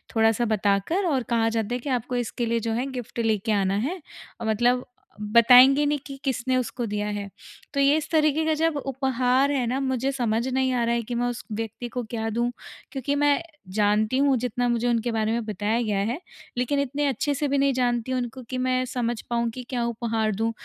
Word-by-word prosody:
थोड़ा-सा 225 +1 +3
बताकर 205 - +1
और 275 -7 +1
कहा 230 -1 +2
जाता 225 0 -2
है - - -3
कि 280 - -6
आपको 250 -1 -1
इसके 240 0 -2
लिए 230 0 0
जो 225 0 -2
है 245 +3 -1
गिफ्ट 245 -2 -6
लेके 220 -1 0
आना 195 -2 +1
है, 360 +3 -5 0.4
मतलब 240 +3 +2 0.4
बताएँगे 250 +6 +7
नहीं 290 0 +1
कि 275 -1 -8
किसने 260 -1 0
उसको 245 0 -2
दिया 210 -1 -2
है। 205 -1 -4 0.4
तो 280 - -1
ये 280 +1 +5
इस 315 - -4
तरीके 310 -1 +3
का 315 - +2
जब 325 -2 +2
उपहार 265 0 +1
है 265 -4 0
ना 255 +3 0
मुझे 265 0 0
समझ 235 -2 0
नहीं 260 0 +1
आ 245 -1 +1
रहा 235 0 +1
है 235 - 0
कि, 240 +2 -5
मैं 245 +1 0
उस 245 -1 -4
व्यक्ति 225 +2 -4
को 245 +1 -4
क्या 225 0 -3
दूँ, 235 +2 0 0.4
क्योंकि 280 0 -2
मैं 290 +1 +3 0.3
जानती 215 +3 +2
हूँ 275 0 +4
जितना 245 0 -1
मुझे 240 0 0
उनके 235 0 +1
बारे 220 -1 0
में 230 0 -1
बताया 215 +2 -1
गया 210 -4 0
है, 230 +9 -1 0.4
लेकिन 250 +3 0
इतने 280 +1 -1
अच्छे-से 285 +2 0
भी 280 0 +1
नहीं 275 0 +3
जानती 245 -1 0
हूँ 255 - +1
उनको 245 +1 -6
कि 255 - -3
मैं 255 0 +1
समझ 240 -2 -2
पाऊँ 235 -1 0
कि 250 +2 -7
क्या 245 -2 -1
उपहार 225 -2 -1
दूँ। 225 +3 0
245 Hz, 215 wpm, -25 LUFS, 225-265 Hz, 0.4 s, बताएँगे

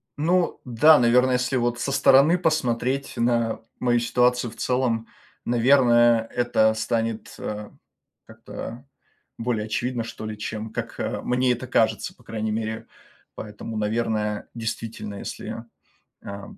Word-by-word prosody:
Ну 170 +4 +1
да, 145 +6 +6
наверно, 125 +2 +4
если 125 +1 +1
вот 120 0 0
со 140 - -2
стороны 140 +4 +5
посмотреть 140 -5 -1
на 115 -2 +1 0.2
мою 120 -1 +2
ситуацию 125 +1 +1
в - - -14
целом, 120 -2 0 0.4
наверное, 120 -2 +4
это 120 -3 +2
станет, 115 0 -2
э, 105 0 -5 0.6
как-то 120 +4 -9 0.5
более 115 -2 -1
очевидно, 120 +2 -2
что 115 -1 -7
ли, 110 0 -5
чем 110 +1 -5
как, - - -6
э, - - -2
мне 125 0 +2
это 125 +2 -5
кажется, 110 -4 +1
по 125 - -23
крайней 110 -1 -3
мере. 110 0 -3 0.5
Поэтому, 110 +1 -7
наверное, 105 -1 -1
действительно, 115 -2 -5
если, 115 - -6 0.6
э, 100 0 -7
120 Hz, 130 wpm, -24 LUFS, 110-125 Hz, 0.6 s, да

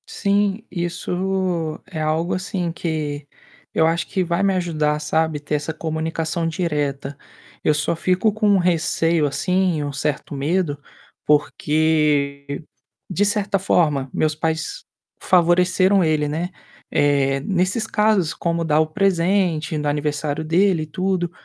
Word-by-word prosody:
Sim, 200 +1 0
isso 180 -1 -2
é 160 -5 -4
algo, 160 +3 0
assim, 180 -1 -2
que 150 -4 -3 0.5
eu 160 - +3
acho 170 +1 0
que 190 - 0
vai 170 +2 0
me 195 -1 +3
ajudar, 155 -4 0
sabe, 155 0 0
ter 150 +1 -3
essa 150 +2 -3
comunicação 160 +1 -2
direta. 145 -5 -2 0.5
Eu 155 - +3
só 150 +2 0
fico 185 +6 +1
com 210 -2 +3
receio, 170 -2 +2
assim, 180 +1 0
um 145 -1 -4
certo 145 +1 -2
medo, 145 +2 0 0.5
porque, 150 -1 +1 0.5
de 195 +2 +1
certa 205 -1 +1
forma, 150 -8 +1
meus 155 -1 +1
pais 160 - -2 0.4
favoreceram 185 +2 +3
ele, 155 -2 +1
né. 165 +4 -2 0.4
Eh, 140 -1 +2
nesses 190 - 0
casos, 210 -7 +2
como 170 -1 -1
dar 155 0 +3
o 155 - +1
presente 175 -2 +1
no 150 0 -2
aniversário 145 +1 -1
dele 170 +1 +2
e - - -5
tudo. 185 +1 -1
165 Hz, 130 wpm, -21 LUFS, 150-185 Hz, 0.5 s, eu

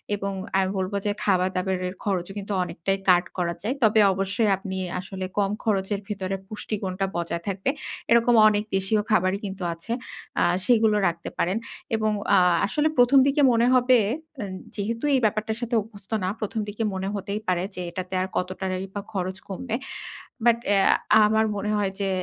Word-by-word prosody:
এবং 200 -1 -3 0.2
আমি 190 -1 +2
বলব 190 +2 -2
যে, 205 - +2
খাবার-দাবারের 185 -1 0
খরচও 190 -1 -1
কিন্তু 200 +1 -4
অনেকটাই 195 +2 -2
কাট 175 0 +5
করা 170 -1 0
যায়। 240 +6 -1
তবে 220 0 +5
অবশ্যই 195 +3 0
আপনি 190 0 -5 0.2
আসলে 190 0 -5
কম 200 -1 +2
খরচের 200 -2 0
ভেতরে 195 -2 -3
পুষ্টিগুণটা 195 -2 -3
বজায় 170 0 -3
থাকবে 195 +4 -1 0.4
এরকম 235 +1 +5
অনেক 210 -1 +2
দেশীয় 195 +3 +2
খাবারই 190 -2 +2
কিন্তু 190 -1 -5
আছে 165 +7 -9 0.5
অ্যা - - +4 0.2
সেগুলো 220 -3 +4
রাখতে 170 0 -3
পারেন 185 +5 +1 0.4
এবং 215 -1 +1 0.2
আ - - +6 0.3
আসলে 305 +1 +2
১ম 245 +3 +6
দিকে 285 +2 +2
মনে 235 +1 +3
হবে, 255 0 +5 0.4
আ - - -2 0.3
যেহেতু 225 +3 -3
এই 265 - +4
ব্যাপারটার 220 +1 0
সাথে 240 0 -1
অভ্যস্ত 200 -1 -14
না 185 - 0
১ম 220 +1 -3
দিকে 210 +2 -3
মনে 190 0 -3
হতেই 200 +1 -3
পারে 180 -1 +1
যে, 180 - -4
এটাতে 185 +2 -6
আর 185 - -1
কত 180 0 -1
টাকাই 185 0 -2
বা 205 - -2
খরচ 185 -1 -2
কমবে 220 +4 -3 0.7
বাট 235 -1 +5
অ্যা 200 -1 +4 0.4
আমার 220 +1 +3
মনে 205 +1 -2
হয় 200 -2 0
যে, 195 - 0
200 Hz, 175 wpm, -25 LUFS, 185-220 Hz, 0.7 s, আ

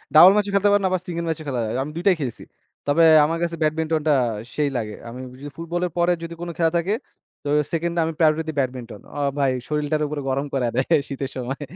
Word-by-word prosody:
Double 175 +5 +10
ম্যাচও 205 -1 +1
খেলতে 200 +1 +4
পারেন 205 -1 +3
আবার 185 -1 0
সিঙ্গল 170 -1 -3
ম্যাচও 160 -1 -2
খেলা 125 -3 -1
যায়। 110 - -3
আমি 150 - -6
২ 170 - -4
টাই 185 - +6
খেলছি। 125 -4 -4 0.4
তবে 160 +4 +4 0.2
আমার 165 +2 -1
কাছে 170 0 -1
ব্যাডমিন্টনটা 155 -1 +1 0.4
সেই 150 -2 +1
লাগে। 105 -2 -3 0.2
আমি 125 +2 -8 0.2
যদি 145 0 -7
ফুটবলের 175 +1 -2
পরে 175 +1 +3
যদি 170 0 -6
কোন 175 - -4
খেলা 165 -1 +2
থাকে 185 +5 0 0.5
তো 145 - -3 0.2
সেকেন্ডে 170 +1 -1
আমি 165 - -2
প্রায়োরিটি 160 0 +2
ব্যাডমিন্টন। 125 -3 -3 0.2
অ - - -2 0.2
ভাই 135 -2 +3 0.2
শরীরটারে 150 0 0
পুরা 150 -1 -3
গরম 140 +2 0
কইরা 125 -3 +1
দেয় 130 - +2 0.2
শীতের 140 -1 -4
সময়। 130 +3 -4
155 Hz, 210 wpm, -23 LUFS, 140-170 Hz, 0.5 s, Double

